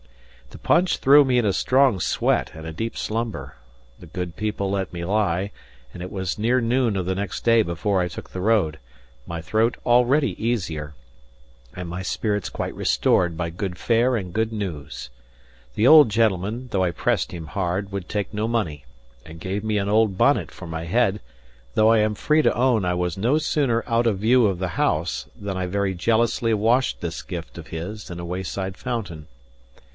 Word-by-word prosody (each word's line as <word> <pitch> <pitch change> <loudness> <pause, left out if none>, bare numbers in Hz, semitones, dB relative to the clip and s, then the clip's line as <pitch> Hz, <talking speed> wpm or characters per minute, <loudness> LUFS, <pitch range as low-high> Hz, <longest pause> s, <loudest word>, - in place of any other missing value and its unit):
The - - -12
punch 175 +2 +2
threw 145 +2 +7
me 130 -2 +1
in 120 - +2
a 100 - +2
strong 130 +1 +3
sweat - - 0
and 80 0 -9
a 80 - -6
deep 115 +8 -4
slumber; 110 - -3 0.4
the 90 - -12
good 90 +1 -5
people 105 -2 -2
let 95 -2 -2
me 85 -1 -5
lie; 100 -1 0 0.4
and 90 - -9
it 90 - -7
was 95 0 -3
near 120 +4 +2
noon 120 -2 +1
of 95 - -2
the 95 - 0
next 100 -1 -4
day 115 -1 +5
before 95 +1 0
I 90 - 0
took - - -9
the 90 - -5
road, 95 -7 +2 0.5
my 85 -1 -5
throat 110 +7 +1
already 125 +4 +4
easier 85 -11 -2 0.8
and 90 -1 -6
my 90 +2 -5
spirits 105 0 -2
quite - - -4
restored 85 -2 +2
by 85 -1 -2
good 90 +1 -4
fare 120 +2 +2
and 90 -4 -6
good 110 0 0
news. 80 - -5 0.7
The 110 - +3
old 150 -5 +8
gentleman, 110 +2 0
although 95 -2 +2
I 90 - +1
pressed - - 0
him 85 -2 -7
hard, 95 +2 -2
would 95 -2 -5
take 105 0 -3
no 105 +1 -1
money, 90 -12 -2 0.4
and 80 +1 -11
gave 95 +4 -3
me 110 -1 0
an 100 -1 -1
old 105 -2 +2
bonnet - - +3
for - - -10
my 80 0 -5
head; 105 +2 +1 0.5
though 110 0 +5
I 115 -1 +5
am 105 0 +1
free 150 +8 +2
to - - +3
own 120 -4 +2
I 90 0 0
was 90 -1 -2
no 120 +9 +2
sooner 140 -6 +1
out 115 0 +2
of 105 -4 +1
view 115 +2 +4
of 95 -3 -1
the 95 -1 -2
house - - -1
than 100 -2 -4
I 90 -1 -2
very 100 +1 -1
jealously 115 +4 +1
washed 115 +5 +2
this 85 -1 -4
gift 85 -3 -7
of 80 - -10
his 95 +6 -6
in 85 -1 -7
a 85 - -5
wayside 95 +2 -4
fountain. 95 -9 -5
100 Hz, 195 wpm, -23 LUFS, 90-115 Hz, 0.8 s, old